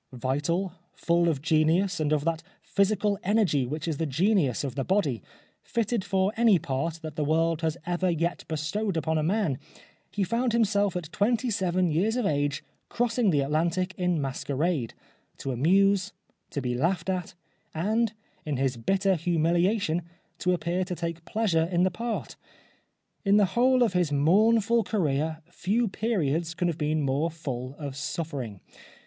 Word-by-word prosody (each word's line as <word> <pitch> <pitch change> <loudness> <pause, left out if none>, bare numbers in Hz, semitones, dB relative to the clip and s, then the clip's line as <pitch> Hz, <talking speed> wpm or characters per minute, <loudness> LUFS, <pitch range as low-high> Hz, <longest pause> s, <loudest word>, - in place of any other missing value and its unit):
Vital, 145 +9 -1 0.2
full 170 0 +2
of 145 -4 -2
genius 165 +4 +2
and 155 -1 0
of 150 -1 +1
that 165 -1 0 0.2
physical 200 0 +1
energy 185 - +2
which 155 +4 -4
is 160 -3 -1
the 160 - -1
genius 160 - +1
of 135 -3 -3
the 135 +1 -2
body, 155 - 0 0.4
fitted 230 -2 -1
for 190 +2 +1
any 225 -4 +5
part 155 +1 -2
that 155 -2 -6
the 150 - -1
world 165 +2 +1
has 160 0 -1
ever 180 +1 0
yet 170 +1 -1
bestowed 165 +5 -2
upon 160 0 0
a - - +1
man, 165 -5 0 0.5
he 205 - -1
found 230 +5 0
himself 205 -4 +2
at 170 -3 -4
twenty 235 +3 +1
seven 185 -3 +1
years 195 +9 +1
of 250 -3 0
age 145 -3 0 0.3
crossing 235 -2 +1
the 145 -5 +3
Atlantic 170 +6 0
in 180 -3 0
masquerade, 140 0 -2 0.4
to 135 - -4
amuse, 190 +8 +3 0.4
to 140 - -4
be 125 -1 -1
laughed 165 +7 0
at, 185 -3 -2 0.4
and 215 +7 0 0.3
in 150 -3 -2
his 130 -2 0
bitter 190 - +1
humiliation 175 +2 +1 0.4
to 180 - +1
appear 175 +1 -1
to 180 -1 -4
take 170 -1 -5
pleasure 180 -8 +1
in 175 0 +3
the 185 - +2
part. 230 +5 -4 0.9
In 200 0 +4
the 205 - +5
whole 255 +1 +4
of 225 - +1
his 175 -4 +1
mournful 215 - +4
career 155 -5 -1
few 215 +7 0
periods 170 -7 -1
can 175 +1 0
have 165 - -4
been 155 0 0
more 140 +4 +1
full 135 -5 -5
of 140 -3 -6
suffering. 140 - -4
170 Hz, 165 wpm, -27 LUFS, 150-200 Hz, 0.9 s, any